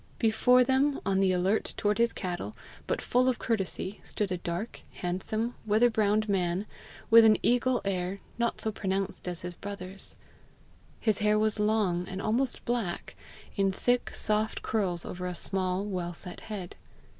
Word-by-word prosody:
Before 245 Hz, +3 st, +4 dB
them, 270 Hz, +3 st, +2 dB
on 195 Hz, -1 st, +2 dB
the 190 Hz, -1 st, +3 dB
alert 185 Hz, +4 st, 0 dB
toward 210 Hz, +1 st, +1 dB
his 235 Hz, 0 st, +4 dB
cattle, 180 Hz, +2 st, -5 dB, 0.3 s
but -, -, -1 dB
full 250 Hz, +1 st, +3 dB
of 255 Hz, -, 0 dB
courtesy, 200 Hz, -2 st, -2 dB
stood 205 Hz, -3 st, -2 dB
a 180 Hz, -, 0 dB
dark, 175 Hz, +7 st, -4 dB
handsome, 215 Hz, +6 st, -2 dB
weather 220 Hz, +3 st, +3 dB
browned 215 Hz, -1 st, +2 dB
man, 185 Hz, -1 st, 0 dB, 0.5 s
with 230 Hz, 0 st, +10 dB
an 220 Hz, -1 st, +6 dB
eagle 245 Hz, +1 st, +2 dB
air, 190 Hz, 0 st, -2 dB, 0.2 s
not 235 Hz, 0 st, 0 dB
so 220 Hz, -, 0 dB
pronounced 195 Hz, -2 st, -3 dB
as 175 Hz, -1 st, -4 dB
his 180 Hz, 0 st, -5 dB
brother's. 195 Hz, 0 st, -8 dB, 0.8 s
His 215 Hz, -3 st, +1 dB
hair 210 Hz, 0 st, +3 dB
was 215 Hz, 0 st, +1 dB
long, 210 Hz, -5 st, +1 dB
and 190 Hz, -, -5 dB
almost 240 Hz, +6 st, +3 dB
black, 230 Hz, -8 st, -2 dB, 0.4 s
in 195 Hz, -1 st, +2 dB
thick, 245 Hz, +6 st, 0 dB
soft 215 Hz, 0 st, 0 dB
curls 185 Hz, -6 st, -1 dB
over 180 Hz, 0 st, -5 dB
a 180 Hz, -, -4 dB
small, 185 Hz, +1 st, +1 dB
well 180 Hz, -4 st, -3 dB
set 180 Hz, +1 st, -8 dB
head. 200 Hz, -5 st, -7 dB
205 Hz, 160 wpm, -29 LUFS, 185-225 Hz, 0.8 s, with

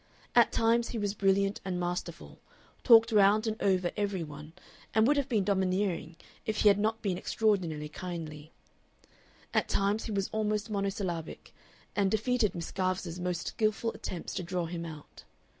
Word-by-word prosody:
At -, -, +5 dB
times 230 Hz, +1 st, +2 dB
he 235 Hz, -, -4 dB
was 205 Hz, -2 st, -1 dB
brilliant 195 Hz, 0 st, +1 dB
and 185 Hz, -2 st, -3 dB
masterful, 175 Hz, 0 st, -4 dB, 0.4 s
talked 230 Hz, -1 st, +7 dB
round 210 Hz, +1 st, +5 dB
and 220 Hz, -1 st, -1 dB
over 185 Hz, -3 st, +2 dB
every 200 Hz, -4 st, -1 dB
one, 150 Hz, +1 st, -10 dB, 0.4 s
and 220 Hz, 0 st, +5 dB
would 290 Hz, +4 st, +4 dB
have 280 Hz, -1 st, 0 dB
been 215 Hz, -5 st, +2 dB
domineering 190 Hz, -3 st, 0 dB, 0.3 s
if 215 Hz, -1 st, -1 dB
he 210 Hz, -, +7 dB
had 200 Hz, 0 st, +4 dB
not 220 Hz, +2 st, 0 dB
been 185 Hz, -4 st, -1 dB
extraordinarily 175 Hz, -9 st, 0 dB
kindly; 155 Hz, -2 st, -7 dB, 1.0 s
at -, -, +1 dB
times 200 Hz, +2 st, +1 dB
he -, -, -4 dB
was 195 Hz, -2 st, 0 dB
almost 215 Hz, 0 st, -1 dB
monosyllabic, 195 Hz, -5 st, -3 dB, 0.4 s
and 200 Hz, -2 st, +2 dB
defeated 220 Hz, 0 st, +1 dB
Miss 170 Hz, -1 st, -5 dB
Garvice's 185 Hz, -2 st, -2 dB
most 175 Hz, -1 st, -2 dB
skilful 220 Hz, +1 st, 0 dB
attempts 175 Hz, -, -6 dB
to 190 Hz, -, -2 dB
draw 180 Hz, 0 st, -2 dB
him 170 Hz, 0 st, -5 dB
out. 155 Hz, -2 st, -11 dB
195 Hz, 160 wpm, -30 LUFS, 175-215 Hz, 1.0 s, talked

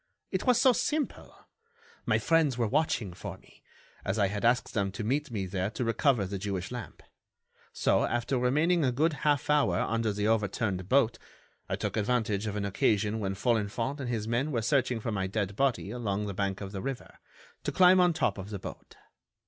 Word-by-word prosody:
"It -, -, -2 dB
was 250 Hz, -1 st, +5 dB
so 260 Hz, -1 st, +6 dB
simple! 300 Hz, +4 st, -3 dB, 0.6 s
My -, -, +3 dB
friends 160 Hz, -6 st, +2 dB
were 120 Hz, -, +1 dB
watching 125 Hz, -, 0 dB
for -, -, -7 dB
me, -, -, -22 dB, 0.4 s
as 95 Hz, -, -1 dB
I 100 Hz, -2 st, +2 dB
had 105 Hz, +2 st, -4 dB
asked 120 Hz, +2 st, +2 dB
them 100 Hz, -2 st, 0 dB
to 105 Hz, -, -4 dB
meet 140 Hz, +7 st, 0 dB
me 105 Hz, -5 st, -3 dB
there 95 Hz, +1 st, -2 dB
to 115 Hz, +3 st, -4 dB
recover 115 Hz, -1 st, +2 dB
the 95 Hz, +1 st, -4 dB
Jewish 95 Hz, -1 st, -3 dB
lamp. 125 Hz, -2 st, -7 dB, 0.7 s
So, -, -, +2 dB
after 120 Hz, +2 st, -1 dB
remaining 155 Hz, +7 st, +2 dB
a 130 Hz, -, +2 dB
good 155 Hz, +6 st, +1 dB
half 145 Hz, -3 st, +1 dB
hour 145 Hz, -12 st, +3 dB
under 115 Hz, -1 st, 0 dB
the 105 Hz, +1 st, -1 dB
overturned 105 Hz, -3 st, 0 dB
boat, 130 Hz, -3 st, +3 dB, 0.5 s
I -, -, 0 dB
took -, -, -3 dB
advantage 110 Hz, -2 st, 0 dB
of 105 Hz, -, -3 dB
an 100 Hz, -1 st, -2 dB
occasion 105 Hz, +2 st, +1 dB
when 95 Hz, -2 st, -2 dB
Folenfant 115 Hz, +5 st, -1 dB
and 130 Hz, -3 st, -4 dB
his 110 Hz, -3 st, -2 dB
men 125 Hz, +6 st, 0 dB
were 115 Hz, -5 st, -1 dB
searching 125 Hz, -1 st, +1 dB
for 115 Hz, +1 st, -3 dB
my 95 Hz, -3 st, -1 dB
dead 100 Hz, 0 st, -2 dB
body 125 Hz, -5 st, 0 dB
along 105 Hz, -4 st, -2 dB
the 100 Hz, -, -4 dB
bank 100 Hz, 0 st, -2 dB
of 100 Hz, -1 st, -6 dB
the 95 Hz, -2 st, -5 dB
river, 135 Hz, +1 st, -6 dB, 0.4 s
to -, -, -1 dB
climb 185 Hz, 0 st, +6 dB
on 180 Hz, -1 st, +5 dB
top 105 Hz, -, 0 dB
of 95 Hz, +1 st, -7 dB
the 105 Hz, -, -4 dB
boat. 95 Hz, -, -10 dB
115 Hz, 200 wpm, -29 LUFS, 100-135 Hz, 0.7 s, so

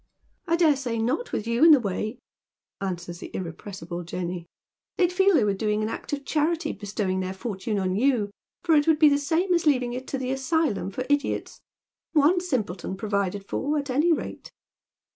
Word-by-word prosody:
" -, -, -43 dB
I 335 Hz, -, +3 dB
dare 325 Hz, -4 st, +4 dB
say 245 Hz, -4 st, -3 dB
not, 250 Hz, -, -1 dB
with 215 Hz, -, -2 dB
you 235 Hz, +4 st, +1 dB
in 330 Hz, -, +9 dB
the 300 Hz, -3 st, +8 dB
way," 215 Hz, +2 st, -3 dB, 0.6 s
answers 175 Hz, -2 st, -4 dB
the -, -, -8 dB
irrepressible 175 Hz, 0 st, -6 dB
Jenny. 175 Hz, 0 st, -5 dB, 0.2 s
" -, -, -67 dB
They'd 355 Hz, -1 st, +2 dB
feel 385 Hz, 0 st, +4 dB
they 265 Hz, -, +4 dB
were 205 Hz, -1 st, +2 dB
doing 210 Hz, +1 st, 0 dB
an 215 Hz, -, -1 dB
act -, -, -6 dB
of 285 Hz, -1 st, -3 dB
charity 315 Hz, +1 st, 0 dB
bestow 205 Hz, 0 st, -3 dB
ing 185 Hz, 0 st, 0 dB
their 185 Hz, 0 st, -3 dB
fortune 210 Hz, 0 st, -3 dB
on 185 Hz, -1 st, 0 dB
you, 230 Hz, -3 st, +2 dB, 0.3 s
for 335 Hz, -, +3 dB
it 295 Hz, 0 st, +4 dB
would 320 Hz, -1 st, +5 dB
be 305 Hz, -1 st, +7 dB
the 285 Hz, 0 st, +2 dB
same 335 Hz, +6 st, +1 dB
as 340 Hz, -2 st, +1 dB
leaving 250 Hz, -4 st, +2 dB
it 255 Hz, +1 st, -6 dB
to 275 Hz, -, -2 dB
the 255 Hz, -1 st, -2 dB
Asylum 270 Hz, -, 0 dB
for 255 Hz, +6 st, -4 dB
Idiots. 290 Hz, 0 st, -1 dB, 0.5 s
One 315 Hz, +4 st, +4 dB
simpleton 210 Hz, -, -3 dB
provided 200 Hz, -1 st, -2 dB
for, 295 Hz, +3 st, -1 dB
at 285 Hz, -2 st, -2 dB
any 300 Hz, +7 st, +3 dB
rate." 320 Hz, -, -3 dB
250 Hz, 200 wpm, -26 LUFS, 195-300 Hz, 0.6 s, in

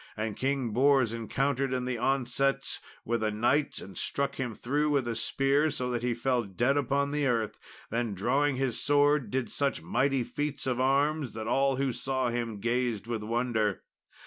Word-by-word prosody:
And 110 Hz, -1 st, -2 dB
King 135 Hz, -3 st, -1 dB
Bors 130 Hz, 0 st, +3 dB
encountered 135 Hz, +4 st, -1 dB
in 125 Hz, -1 st, -1 dB
the 125 Hz, -2 st, -2 dB
onset 135 Hz, +1 st, 0 dB, 0.3 s
with 115 Hz, 0 st, 0 dB
a 110 Hz, -, +1 dB
knight, 120 Hz, +8 st, +1 dB
and 95 Hz, -, -10 dB
struck 140 Hz, 0 st, -2 dB
him 125 Hz, -4 st, -3 dB
through 145 Hz, +4 st, 0 dB
with 140 Hz, -4 st, +1 dB
a 120 Hz, -, -1 dB
spear, 140 Hz, +5 st, +2 dB
so 125 Hz, -4 st, -2 dB
that 120 Hz, -1 st, -1 dB
he 120 Hz, -1 st, 0 dB
fell 125 Hz, 0 st, +1 dB
dead 120 Hz, +6 st, 0 dB
upon 140 Hz, 0 st, +1 dB
the 145 Hz, -1 st, +1 dB
earth; 115 Hz, -4 st, -1 dB, 0.3 s
then 115 Hz, -2 st, -1 dB
drawing 140 Hz, +8 st, +1 dB
his 125 Hz, -3 st, -1 dB
sword, 145 Hz, -1 st, +3 dB
he -, -, -12 dB
did 125 Hz, -2 st, -2 dB
such 140 Hz, -1 st, 0 dB
mighty 135 Hz, -2 st, +1 dB
feats 145 Hz, +2 st, -3 dB
of 130 Hz, -2 st, 0 dB
arms 140 Hz, +1 st, +1 dB
that 110 Hz, 0 st, -5 dB
all 135 Hz, +3 st, +2 dB
who 135 Hz, -1 st, 0 dB
saw 130 Hz, -1 st, -1 dB
him 115 Hz, -3 st, -3 dB
gazed 120 Hz, -1 st, 0 dB
with 115 Hz, -2 st, -3 dB
wonder. 110 Hz, -3 st, 0 dB
130 Hz, 185 wpm, -29 LUFS, 115-140 Hz, 0.3 s, Bors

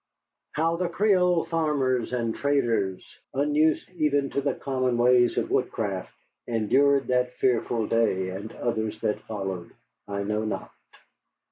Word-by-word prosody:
How 165 Hz, +2 st, +1 dB
the 180 Hz, 0 st, -1 dB
Creole 180 Hz, -3 st, +3 dB
farmers 145 Hz, -8 st, 0 dB
and 115 Hz, -2 st, -1 dB
traders, 115 Hz, -10 st, 0 dB, 0.3 s
unused 150 Hz, +2 st, +2 dB
even 145 Hz, -5 st, 0 dB
to 140 Hz, -, 0 dB
the 140 Hz, -, -1 dB
common 130 Hz, -3 st, -1 dB
ways 120 Hz, 0 st, +4 dB
of -, -, -1 dB
woodcraft, 100 Hz, -4 st, -1 dB, 0.4 s
endured 135 Hz, +5 st, +3 dB
that 125 Hz, 0 st, +1 dB
fearful 120 Hz, -2 st, +1 dB
day 105 Hz, -5 st, +1 dB
and 100 Hz, +4 st, -6 dB
others 110 Hz, -2 st, -2 dB
that 105 Hz, -, 0 dB
followed, 95 Hz, -5 st, -5 dB, 0.4 s
I 100 Hz, 0 st, -3 dB
know 105 Hz, +2 st, -1 dB
not. 110 Hz, -, -4 dB
125 Hz, 130 wpm, -26 LUFS, 110-145 Hz, 0.4 s, ways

